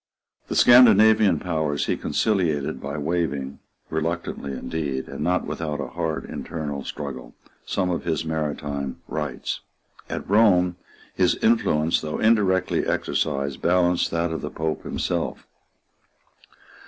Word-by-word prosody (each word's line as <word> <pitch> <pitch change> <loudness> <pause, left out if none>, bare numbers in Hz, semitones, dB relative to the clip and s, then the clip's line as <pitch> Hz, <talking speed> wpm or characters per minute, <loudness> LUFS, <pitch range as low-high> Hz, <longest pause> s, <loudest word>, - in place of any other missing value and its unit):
The - - -3
Scandinavian 110 -4 +7
powers 80 -5 -1
he - - 0
conciliated 85 -10 0
by 70 +2 -4
waiving, 70 -4 -2 0.3
reluctantly 80 -3 -3
indeed, 70 -1 -3
and - - -5
not 90 +1 +1
without 75 -3 -4
a 70 - -4
hard 80 -2 -3
internal 75 -4 -5
struggle, 70 -4 -7 0.3
some 90 -2 0
of 85 - -2
his 80 -2 -1
maritime 75 -3 -3
rights. 75 -4 -3 0.5
At - - -4
Rome 90 -4 +4 0.4
his - - +2
influence, 85 -8 +2
though 75 -1 -3
indirectly 105 -5 +2
exercised, 70 0 -1
balanced 90 0 +2
that 85 0 -1
of 80 - -3
the - - -4
Pope 80 -1 -3
himself. - - -3
80 Hz, 120 wpm, -24 LUFS, 75-90 Hz, 0.5 s, Scandinavian